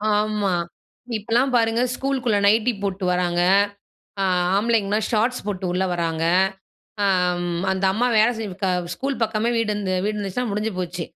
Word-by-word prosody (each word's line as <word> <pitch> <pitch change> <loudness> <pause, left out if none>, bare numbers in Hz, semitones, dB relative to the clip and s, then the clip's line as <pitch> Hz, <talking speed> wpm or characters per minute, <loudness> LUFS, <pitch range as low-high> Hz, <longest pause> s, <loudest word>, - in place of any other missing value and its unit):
ஆமா, 210 -2 0 0.7
இப்போலாம் 235 +5 +1
பாருங்க. 230 0 +2
ஸ்கூலுக்குள்ள 260 -6 0
நைட்டி 225 +3 +3
போட்டு 195 -1 -3
வர்றாங்க, 175 -1 +1 0.8
ஆ, - - +2 0.3
ஆம்பளைங்கலாம் 215 -1 +1
ஷார்ட்ஸ் 235 +2 0
போட்டு 190 -2 -3
உள்ள 185 +1 0
வர்றாங்க. 165 -2 -1 0.8
ஆ - - +3 0.4
ம் 175 0 -2
அந்த 190 0 0
அம்மா 245 +4 +1
வேலை 220 +3 +5
செஞ்சுகா 195 -3 -3 0.2
ஸ்கூல் 270 +7 -3
பக்கமே 220 +1 0
வீடு 225 -2 0
இருந்தது 185 -3 -1
வீடு 210 0 -1
இருந்துச்சுன்னா, 210 +4 -3
முடிஞ்சு 210 +2 -1
போச்சு. 175 -1 -4
210 Hz, 145 wpm, -22 LUFS, 185-230 Hz, 0.8 s, வேலை